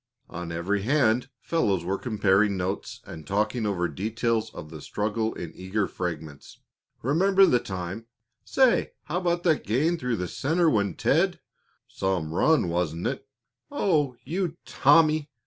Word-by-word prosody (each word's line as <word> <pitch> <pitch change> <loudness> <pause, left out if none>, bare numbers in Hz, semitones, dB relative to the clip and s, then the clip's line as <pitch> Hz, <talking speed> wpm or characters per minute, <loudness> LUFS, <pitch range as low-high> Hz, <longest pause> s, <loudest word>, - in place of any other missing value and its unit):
On 85 -1 -6
every 90 +5 -1
hand 125 0 +2
fellows 100 - 0
were 95 +2 -1
comparing 105 -3 +2
notes 95 +2 -4
and 80 -2 -10
talking 105 +3 0
over 90 -3 0
details 110 +2 -1
of 75 - -9
the 80 -2 -9
struggle 110 +5 -2
in 85 - -6
eager 95 +2 -2
fragments. 80 -5 -6 0.4
"Remember 190 - +4
the 125 -9 +3
time 95 +2 -6 0.2
" 120 0 -55
"Say, 260 -3 +2
how 170 +5 -2
about 175 -1 0
that 160 -4 +2
gain 155 +11 +1
through 115 - -1
center 160 - +1
when 100 -5 +1
Ted - - +2 0.3
" - - -42
"Some 90 -5 -2
run, 155 - +3
wasn't 85 -1 -2
it?" 135 +1 -3 0.4
"Oh, 155 - +1
you 170 +2 -2
Tommy!" 155 -2 +4
110 Hz, 145 wpm, -26 LUFS, 95-150 Hz, 0.4 s, Remember